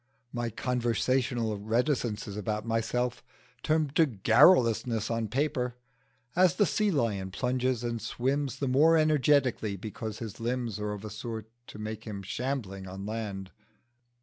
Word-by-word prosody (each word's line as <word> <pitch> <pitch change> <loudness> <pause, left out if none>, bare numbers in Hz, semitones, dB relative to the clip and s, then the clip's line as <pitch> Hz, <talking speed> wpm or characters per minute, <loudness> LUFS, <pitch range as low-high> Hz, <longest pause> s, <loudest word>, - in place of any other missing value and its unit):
My 120 -1 -1
conversational 120 -1 0
reticences 110 -2 -1
about 105 +1 -2
myself 115 +2 -1 0.4
turn 155 0 +2
into 155 +2 +2
garrulousness 115 - +4
on 115 -1 -1
paper 125 0 -1 0.6
as 180 0 +5
the 205 - +4
sea 210 +4 +1
lion 110 - 0
plunges 125 +3 -1
and 120 -1 -2
swims 135 +2 -1
the 140 - -1
more 155 +6 +5
energetically 140 -8 +3
because 110 +2 -6
his 115 -2 -7
limbs 120 -2 -2
are 105 0 -2
of 105 +1 -7
a 105 - -6
sort 110 +1 -6 0.2
to - - -10
make 110 +1 -6
him 100 -3 -6
shambling 100 -4 -3
on 95 +1 -7
land. 100 -3 -4
115 Hz, 140 wpm, -29 LUFS, 105-130 Hz, 0.6 s, as